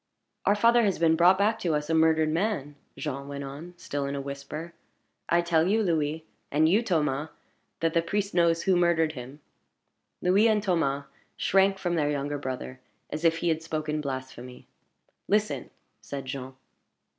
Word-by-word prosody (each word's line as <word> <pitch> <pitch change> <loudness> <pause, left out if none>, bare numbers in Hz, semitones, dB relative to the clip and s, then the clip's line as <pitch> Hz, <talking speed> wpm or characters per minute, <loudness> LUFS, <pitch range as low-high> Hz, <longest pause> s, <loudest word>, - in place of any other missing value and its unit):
"Our 205 - +5
father 235 +3 +5
has 200 -5 +1
been 165 -1 +3
brought 175 +3 +5
back 215 +3 +2
to 165 -4 0
us 150 0 -2
a 165 - 0
murdered 160 -1 +3
man!" 165 -5 -1 0.2
Jean 140 -2 -4
went 140 0 -5
on, 150 +6 -8
still 145 -3 -3
in 140 - -3
a - - -3
whisper. 140 +4 -6 0.6
"I 170 +1 +4
tell 170 -1 +2
you, 220 +3 +2
Louis 160 -3 -1 0.2
and 155 +2 +3
you, 200 +7 +4
Thomas 155 - 0 0.5
that 165 -1 +1
the 170 - +3
priest 200 +4 -2
knows 170 -1 +3
who 190 - +3
murdered 170 -2 +3
him." 135 +1 -10 0.8
Louis 195 +5 +4
and 215 -2 +2
Thomas 145 -7 0 0.3
shrank 195 0 +3
from 175 -2 -2
their 150 -3 +1
younger 145 0 -2
brother 130 -1 -5 0.3
as 155 +2 -4
if 165 -1 +3
he - - +3
had 160 -1 0
spoken 155 -2 -3
blasphemy. 130 -2 -7 0.6
"Listen," 200 - 0 0.3
said 135 +3 -6
Jean. 130 0 -6
160 Hz, 170 wpm, -27 LUFS, 140-180 Hz, 0.8 s, Our